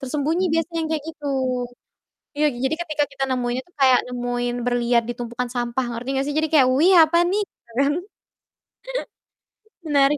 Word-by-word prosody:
Tersembunyi 300 +6 -1
biasanya 330 +1 -1
yang 320 - -2
kayak 310 -2 -2
gitu. 300 -2 -8 1.1
Iya, 300 - +1
j - - -9
jadi 265 - +1
ketika 305 -3 0
kita 275 - -5
nemuinnya 250 0 -1
tuh 355 - -30
kayak 260 -2 +6
nemuin 245 0 -2
berlian 240 -1 +2
di 240 - -1
tumpukan 240 +1 -4
sampah, 240 +1 -1
ngerti 235 +2 -6
enggak 270 0 0
sih? 290 - -2
Jadi 315 0 +1
kayak, 275 -5 +6
"Wih, 345 +7 +5
apa 315 +2 0
nih?" 410 - +1 0.2
Gitu 235 - -28
kan. 280 +1 +3 2.0
Menarik 285 0 +3
270 Hz, 170 wpm, -22 LUFS, 245-305 Hz, 2.0 s, kayak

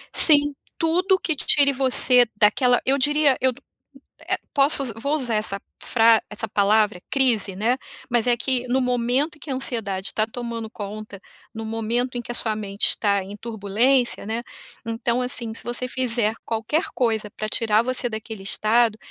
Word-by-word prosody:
Sim, 290 -2 +7 0.2
tudo 360 +4 +1
que 320 -4 -2
tire 280 0 +4
você 255 -1 +4
daquela 245 +4 +3
eu 270 +2 +2
diria, 295 0 +2
eu 260 0 +3 0.7
eh, 370 +3 -2 0.2
posso 280 0 +4 0.2
vou 280 +5 -1
usar 245 -7 0
essa 200 -2 0 0.2
fra 225 -1 +3
essa 220 +1 -4
palavra: 205 -1 +1
crise, 235 -8 +1
né, 230 +6 0 0.3
mas 240 -2 +1
é 240 - +4
que 250 +1 -2
no 260 +2 0
momento 250 +5 0
em - - -27
que 290 - -10
a - - 0
ansiedade 200 -7 -2
tá 215 - +1
tomando 230 -1 -6
conta, 205 -1 -9 0.3
no 225 - -7
momento 230 +3 -2
em 240 - -3
que - - -7
a 240 - -3
sua 220 -2 -2
mente 200 -1 -2
está 200 -2 +2
em 200 +2 -9
turbulência, 230 +4 0
né, 225 +2 -3 0.4
então, 235 +2 -2
assim, 240 -3 -1
se - - -6
você 240 +1 -2
fizer 240 -4 -1
qualquer 230 - -1
coisa 220 -4 -1
pra 215 +1 -6
tirar 215 0 +1
você 255 0 0
daquele 220 -1 -8
estado 220 +2 +2
235 Hz, 170 wpm, -22 LUFS, 215-260 Hz, 0.7 s, Sim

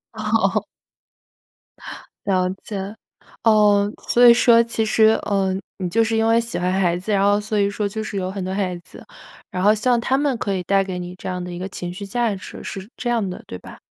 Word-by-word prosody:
哦。 - - 0 1.6
了 185 -2 +1
解。 200 0 -5 0.5
哦， 210 -2 +4 0.2
所 245 0 +6
以 235 - +10
说 235 -1 +5
其 230 -1 -2
实， 220 0 +4
呃， 195 -2 0 0.2
你 185 -2 -3
就 225 +5 +2
是 225 0 0
因 225 - +2
为 230 +1 +4
喜 230 -6 -5
欢 180 +1 0
孩 180 -3 +1
子， 190 +4 -5
然 195 -1 +2
后 205 +1 +3
所 210 0 -2
以 200 0 +2
说 205 0 -2
就 220 +2 -4
是 205 - -5
有 185 -1 -2
很 195 -1 -5
多 185 +1 -3
孩 190 -2 -1
子。 175 - -15 0.5
然 180 - -2
后 210 +2 +6
像 240 +3 +2
他 260 +3 +1
们 285 -2 +1
可 200 -3 -2
以 185 - -3
带 195 +2 +2
给 190 -2 -5
你 180 0 -7
这 185 - -7
样 180 -1 -4
的 180 - -6
一 175 - -6
个 185 - -4
情 175 -1 -6
绪 200 +2 -7
价 230 +1 -1
值， 190 - -10
是 195 0 -7
这 245 - -3
样 230 -4 0
的， 180 - -7
对 90 - -7
吧？ - - -12
200 Hz, 240 characters per minute, -21 LUFS, 185-225 Hz, 1.6 s, 以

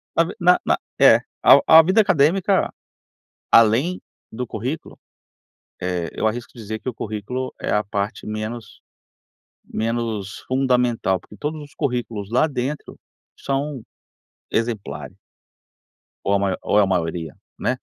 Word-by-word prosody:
Na 165 - +5
v 190 - -6
na 180 +1 +7
na - - +4 0.2
é, - - +7 0.2
ao - - +7
a 160 0 +9
vida 190 +7 +4
acadêmica, 185 +3 +2 0.8
além 115 +11 +4 0.3
do 125 +3 -4
currículo, 125 +7 -5 0.8
eh, 90 -2 -2
eu - - 0
arrisco 120 +3 -4
dizer 110 -2 -6
que 130 - -4
o - - -6
currículo 110 +4 -4
é - - -3
a 105 - +2
parte 100 +1 -3
menos 110 +1 -6 0.8
menos 115 -2 -3
fundamental, 125 -7 +1
porque 105 - -16
todos 150 +4 -4
os 145 -1 -14
currículos 115 -6 -3
lá 125 +6 +3
dentro 140 0 -4 0.4
são 135 -1 -3 0.7
exemplares. 100 - -3 1.1
Ou 100 - +1
a 100 - +3
mai 95 -2 0
ou - - +1
a 105 - +6
maioria, 85 -4 -2 0.2
né. - - 0
115 Hz, 135 wpm, -22 LUFS, 105-135 Hz, 1.1 s, a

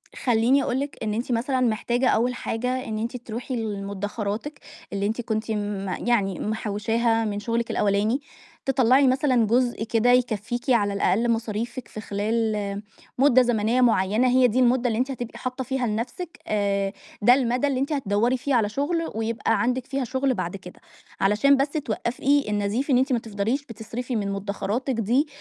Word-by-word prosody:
خلّيني 245 +3 +2
أقول 255 +2 -1
لِك 280 0 -4
إن 210 -1 -1
أنتِ 240 +3 -3
مثلًا 255 +3 0
محتاجة 240 +2 +1
أول 245 +3 +2
حاجة 250 +3 -2
إن 220 -2 -3
أنتِ 235 +3 -3
تروحي 240 +2 -5
لمدخراتِك 205 +4 -4 0.3
اللي 200 0 -1
أنتِ 225 +3 -1
كنتِ 220 -1 -2
م 205 -2 -3 0.2
يعني 200 -5 +1
محوشاها 225 +2 0
من 205 -1 -2
شغلِك 230 +2 -2
الأولاني، 210 +6 +1 0.4
تطلّعي 265 +1 +4
مثلًا 255 -3 +3
جزء 240 0 +1
كده 230 +2 +2
يكفيكِ 240 0 0
على 205 -5 +3
الأقل 225 +4 +1
مصاريفِك 230 +2 -3
في 215 - -8
خلال 210 -1 -1 0.4
مُدة 260 -1 +5
زمنية 240 +1 +1
معيّنة، 220 +1 +3
هي 255 0 +5
دي 245 +2 0
المُدة 250 0 +3
اللي 225 0 0
أنتِ 260 +2 0
هتبقي 240 -3 -6
حاطة 255 +1 -3
فيها 255 -2 -1
لنفسِك، 240 +11 -4
آآ، 200 -1 0 0.3
ده 240 +4 +7
المدى 250 +1 +1
اللي 265 -2 0
أنتِ 280 +3 -1
هتدوّري 240 0 +1
فيه 270 +1 0
على 210 -3 +2
شغل 325 +7 -1
ويبقى 225 -1 0
عندِك 250 +2 0
فيها 275 0 -2
شغل 260 +2 0
بعد 175 -5 -3
كده، 180 -2 -11 0.4
علشان 210 +8 +4
بس 275 +1 +1
توقفي 275 -1 0
النزيف 210 +7 -1
إن 260 - +5
أنتِ 260 +1 +2
ما 235 - +2
تفضليش 225 +6 -2
بتصرفي 230 +3 -5
من 200 -2 -1
مدخراتِك 200 +6 -2
دي 240 +7 +1
235 Hz, 170 wpm, -24 LUFS, 210-255 Hz, 0.4 s, ده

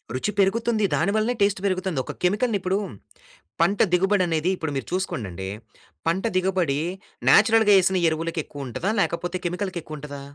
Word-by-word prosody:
రుచి 130 +11 -1
పెరుగుతుంది. 220 +3 +2
దాని 175 +5 +1
వల్లనే 220 +3 +1
టేస్ట్ 200 -1 +2
పెరుగుతుంది. 185 -5 -1
ఒక - - -6
కెమికల్‌ని 210 +4 +2
ఇప్పుడు 185 +1 0 0.8
పంట 195 +4 +2
దిగుబడనేది 180 -3 +2
ఇప్పుడు 160 -3 -3
మీరు 135 - -3
చూసుకోండండి, 100 - -3 0.6
పంట 170 +4 +1
దిగుబడి 180 -6 +1 0.5
న్యాచురల్‌గా 220 -2 +6
ఏసిన 185 +1 +2
ఎరువులకి 165 +1 -2
ఎక్కువుంటదా? 145 - -4
లేకపోతే 175 +1 -2
కెమికల్‌కి 180 +1 -2
ఎక్కువుంటదా? 145 -2 -8
185 Hz, 135 wpm, -24 LUFS, 160-200 Hz, 0.8 s, న్యాచురల్‌గా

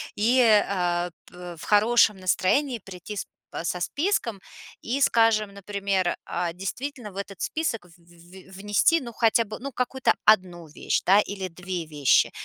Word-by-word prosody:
И, 235 +5 +2
э-э, 180 -6 +2
п 180 -1 -10
в - - -11
хорошем 215 0 +4
настроении 225 +8 +1
прийти 190 +2 -9
с - - -3
п - - -49 0.3
со 180 +1 -2
списком 280 - -1 0.4
и, 265 +5 -2
скажем, 225 -5 +3
например, 200 -2 -2
э, 170 -1 -2
действительно 220 +4 -6
в 190 - -13
этот 195 -2 -7
список 270 - -2
в 175 0 -20
в 175 +2 -17
в 190 - -11
внести, 205 +11 +2
ну, 240 -3 -7
хотя 230 0 +2
бы, 215 0 -8
ну, 275 +3 -7
какую-то 255 +1 0
1 180 -6 +3
вещь, 150 - -2
да, 195 +3 +5
или 195 -2 -3
2 180 -1 -6
вещи. 145 -4 +3
200 Hz, 165 wpm, -25 LUFS, 180-230 Hz, 0.4 s, да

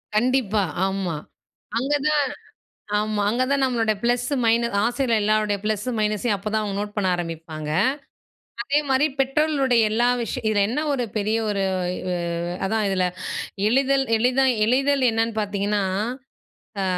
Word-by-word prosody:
கண்டிப்பா. 220 -3 +2 0.2
ஆமா. 190 -4 -2 0.6
அங்கதான் 290 +3 +1 0.8
ஆமா. 215 -1 -1
அங்கே 240 +4 +1
தான் 280 -1 +2
நம்மளோட 230 -4 +1
பிளஸ் 245 +1 +1 0.2
மைனஸ் 230 -1 +2
ஆசிரியரோட 240 0 +1
எல்லோருடைய 215 -1 +1
பிளஸ் 215 +1 -1
மைனஸையும் 210 +1 +1
அப்போதான் 215 +2 -2
அவங்க 200 -2 -3
நோட் 205 0 -5
பண்ண 205 -3 0
ஆரம்பிப்பாங்க. 165 -3 -6 0.9
அதே 285 +3 +2
மாதிரி 265 +2 +3
பெற்றோர்களுடைய 270 -3 +2
எல்லா 240 +2 +2
விஷயம் 235 +1 -4
இதில 205 -2 +2
என்ன 255 +6 -1
ஒரு 250 -3 -1
பெரிய 215 +2 0
ஒரு 200 -1 0 1.0
அதான் 215 +1 0
இதில் 185 -1 +1 0.6
எளிதில் 270 +2 +2
எளிதா 255 +4 +2 0.2
எளிதில் 270 +3 +2
என்னன்னு 225 0 0
பார்த்தீங்கன்னா, 205 0 -1 1.0
அ - - 0
225 Hz, 125 wpm, -23 LUFS, 205-260 Hz, 1.0 s, மாதிரி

